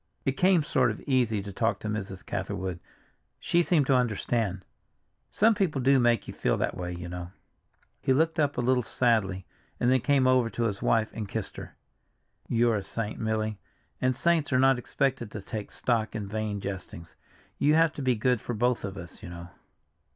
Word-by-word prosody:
It 135 - +3
came 180 +3 +3
sort 130 -4 +2
of 110 - -4
easy 120 -7 +1
to 100 0 -7
talk 115 -1 +1
to - - -4
Mrs. 100 -3 -4
Catherwood—she 95 - -4
seemed 160 -4 +2
to 135 - +3
understand; 110 -5 0 0.6
some 225 +2 +4
people 180 -9 0
do 135 +1 +4
make 120 -3 +2
you - - -6
feel - - 0
that - - -1
way, 90 0 -4
you 85 0 -6
know." 90 0 -6 0.7
He - - +1
looked 160 +4 +2
up 145 -2 +1
a - - +1
little 125 +1 +2
sadly, 110 -6 +1 0.3
and 120 - +3
then 130 - +4
came 135 +1 +3
over 130 -2 +4
to 120 - -2
his 105 -4 -1
wife 110 -1 +2
and 105 -3 -5
kissed - - -4
her. - - -9 0.7
"You're 115 -1 +3
a - - -2
saint, 105 +2 -5
Milly, 110 -1 -1 0.4
and 130 0 +2
saints 165 +1 +1
are 130 - +3
not 135 0 +4
expected 125 -2 -1
to 105 - -7
take 105 -1 -5
stock 115 -2 -1
in 105 -2 -3
vain 105 0 -3
jestings. 90 -4 -7 0.4
You 150 +2 +4
have 165 -1 +4
to 145 - -6
be 130 -2 +2
good 125 +1 +1
for 120 - -4
both 120 +2 +1
of 100 0 -5
us, 90 -3 -10
you - - -8
know." 85 0 -9
115 Hz, 195 wpm, -28 LUFS, 100-130 Hz, 0.7 s, some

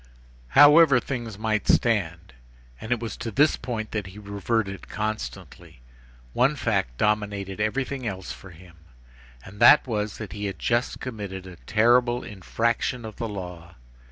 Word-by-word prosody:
However 145 -2 +8
things 120 -5 -5
might 110 -1 -1
stand,—and 80 - -2
it 120 - +2
was 115 -3 -5
to 115 0 -5
this 145 +7 +3
point 115 -3 -5
that 105 -3 -3
he 95 +2 -12
reverted 100 0 -3
constantly,—one - - -4
fact 95 - -1
dominated 100 -2 -1
everything 130 +4 -2
else 95 -3 -5
for 95 - -10
him, 85 0 -16 0.7
and 100 +2 -12
that 120 +5 +7
was, 105 -4 -3
that 105 -5 -7
he 105 0 -5
had 100 - -4
just 120 +1 -1
committed 100 -6 -6
a 90 -2 -11
terrible 120 +2 +3
infraction 115 +4 -2
of 110 -2 -9
the 115 - -3
law. 90 -3 -8
105 Hz, 140 wpm, -25 LUFS, 95-120 Hz, 0.7 s, However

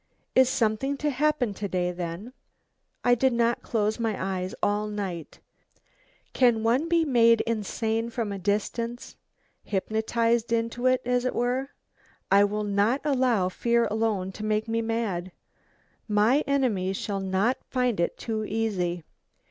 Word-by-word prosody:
Is 260 -1 +5
something 255 +4 0
to 295 +1 0
happen 275 -5 +1
to 200 +1 -4
day 180 -2 -1
then? 175 +7 -6 0.7
I 245 - +5
did 255 +1 +2
not 235 0 +1
close 215 0 -1
my 225 -3 -1 0.2
eyes 185 +1 -4
all 205 +1 +1
night. 190 -7 -5 0.9
Can 240 -4 +3
one 255 +8 +2
be 335 -1 +3
made 230 -4 +5
insane 225 +1 -2
from 230 -3 -3
a 200 - -4
distance? 230 +4 -2 0.5
hypnotised 230 +3 0
into 230 +2 0
it, 255 0 +2
as 245 0 +1
it 255 - -1
were? 250 +3 0 0.6
I 200 +1 +6
will 210 +1 -2
not 205 +6 +1
allow 255 -9 +2
fear 235 +4 +1
alone 215 -4 0
to 210 - -8
make 215 +1 0
me 225 0 0
mad. 220 -6 -2 0.8
My 215 +6 +3
enemy 230 -10 +1
shall 200 +1 -3
not 195 +6 0
find 250 -6 0
it 170 - 0
too 220 -2 -3
easy. 195 -6 -2
225 Hz, 145 wpm, -26 LUFS, 205-245 Hz, 0.9 s, I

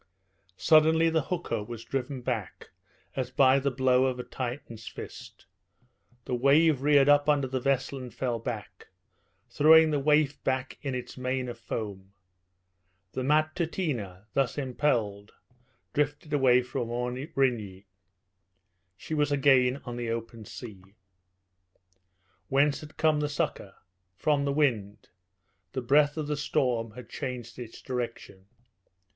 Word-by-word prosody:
Suddenly 160 +1 +5
the 160 -1 +2
hooker 145 - -3
was 115 +1 -8
driven 135 0 -3
back, 115 -7 -4 0.4
as 130 -2 -2
by 130 +1 +4
the 140 +1 0
blow 130 0 +3
of 130 -1 -1
a 125 - -4
Titan's 120 -4 -6
fist. - - -10 0.8
The - - -4
wave 140 +3 +4
reared 145 -1 +5
up 145 0 +5
under 145 -2 +3
the 130 0 -2
vessel 135 +1 0
and 125 -1 -8
fell 120 -2 -2
back, 115 -2 -7 0.6
throwing 160 +1 +6
the 145 - +1
waif 150 0 +2
back 130 -1 -2
in 135 -3 -3
its 125 +1 -7
mane 130 0 -2
of 120 -1 -7
foam. 100 -4 -6 1.0
The 130 - -3
Matutina, 150 - -1
thus 135 -2 0
impelled, 120 -7 -1 0.6
drifted 145 +1 -1
away 130 -3 +4
from 120 -1 -4
Aurigny. 125 -5 -2 1.1
She - - -7
was 150 -1 +1
again 135 -2 +3
on 120 -1 -5
the 120 -1 -3
open 115 -1 -5
sea. 105 -3 -9 1.7
Whence 140 +1 +2
had 155 0 -12
come 155 -1 +3
the 150 0 -1
succour? 145 - -3 0.4
From 145 - +1
the 140 - 0
wind. 110 -8 0 0.6
The 130 - -2
breath 145 +4 +3
of 155 - -2
the 150 0 -2
storm 125 -5 0
had 125 0 -10
changed 125 -3 -6
its 120 -2 -9
direction. 115 -6 -5
130 Hz, 135 wpm, -28 LUFS, 120-145 Hz, 1.7 s, throwing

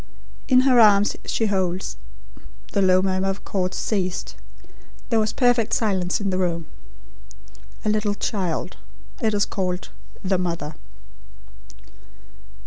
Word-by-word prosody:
In 255 -1 +6
her 260 -2 +5
arms 205 -2 +5
she 225 - 0
holds" 190 -3 -1 0.8
the 200 - +1
low 185 -1 +4
murmur 190 0 0
of 195 +1 -5
chords 185 -2 -2
ceased; 185 -4 -2 0.8
there 225 - +4
was 215 0 +1
perfect 245 -3 +2
silence 190 -5 0
in 200 -2 -1
the 185 - 0
room 170 -3 -1 1.2
"a - - +2
little 210 -1 +1
child. 190 -5 -2 0.4
It 220 -3 +1
is 205 - +2
called: 180 -2 -3 0.3
'The 190 -1 +1
Mother.'" 170 -4 -3
195 Hz, 125 wpm, -23 LUFS, 185-215 Hz, 1.2 s, In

